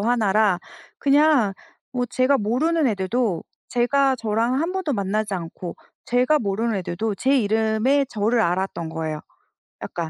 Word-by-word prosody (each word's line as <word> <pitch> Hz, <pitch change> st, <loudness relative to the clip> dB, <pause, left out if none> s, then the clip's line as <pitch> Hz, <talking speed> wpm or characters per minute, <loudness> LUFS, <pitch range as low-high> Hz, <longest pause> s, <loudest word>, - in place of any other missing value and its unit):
하나라 215 Hz, -4 st, +2 dB, 0.4 s
그냥 285 Hz, -6 st, +4 dB, 0.4 s
뭐 245 Hz, -1 st, -1 dB
제가 260 Hz, +3 st, +2 dB
모르는 295 Hz, +9 st, +1 dB
애들도 205 Hz, -3 st, 0 dB, 0.3 s
제가 265 Hz, +2 st, +2 dB
저랑 225 Hz, +2 st, 0 dB
1 335 Hz, +3 st, -1 dB
번도 375 Hz, -6 st, -2 dB
만나지 205 Hz, 0 st, -1 dB
않고 170 Hz, 0 st, -6 dB, 0.3 s
제가 250 Hz, +5 st, +3 dB
모르는 220 Hz, 0 st, -1 dB
애들도 195 Hz, +3 st, -3 dB
제 270 Hz, +5 st, +2 dB
이름의 220 Hz, +5 st, +2 dB
저를 225 Hz, +1 st, +1 dB
알았던 180 Hz, -3 st, -1 dB
거예요, 155 Hz, -1 st, -4 dB, 0.6 s
약간. 170 Hz, -2 st, -4 dB
225 Hz, 280 characters per minute, -23 LUFS, 195-260 Hz, 0.6 s, 그냥